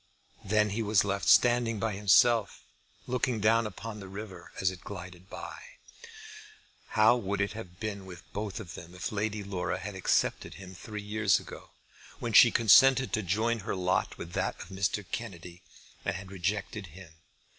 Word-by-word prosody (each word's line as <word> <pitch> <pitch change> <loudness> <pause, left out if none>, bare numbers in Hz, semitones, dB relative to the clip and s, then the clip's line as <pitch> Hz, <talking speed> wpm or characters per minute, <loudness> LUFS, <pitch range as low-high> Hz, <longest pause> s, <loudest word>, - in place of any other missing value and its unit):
Then 105 0 +2
he 110 +3 -2
was 105 -3 +3
left 100 0 -1
standing 120 -2 +4
by 110 +1 -1
himself, 105 +2 +3 0.4
looking 125 -2 -1
down 115 +2 +3
upon 105 +1 -7
the 95 - -9
river 95 -2 -9
as 95 -1 +2
it 90 0 -12
glided 90 -1 -9
by. - - -8 1.4
How 110 +3 +6
would 100 -4 -2
it 100 0 0
have 95 -5 -9
been 100 -3 -5
with 90 -2 -10
both 105 -1 -4
of 90 -6 -8
them 85 +1 -10
if 90 - -4
Lady 105 0 -2
Laura 95 -2 -3
had 105 +3 -6
accepted 95 -1 0
him 95 -1 -10
three 105 +3 -7
years 105 -1 +2
ago, - - -11 0.5
when 115 -2 -4
she 120 - +9
consented 130 +4 +5
to 110 - +1
join 110 +5 0
her 100 - -3
lot 95 0 0
with 85 - -8
that - - -2
of - - -9
Mr. 95 +1 -1
Kennedy, 90 -6 -6 0.4
and - - -1
had 95 +1 -8
rejected 100 +2 -3
him? 85 0 -13
100 Hz, 170 wpm, -29 LUFS, 95-110 Hz, 1.4 s, she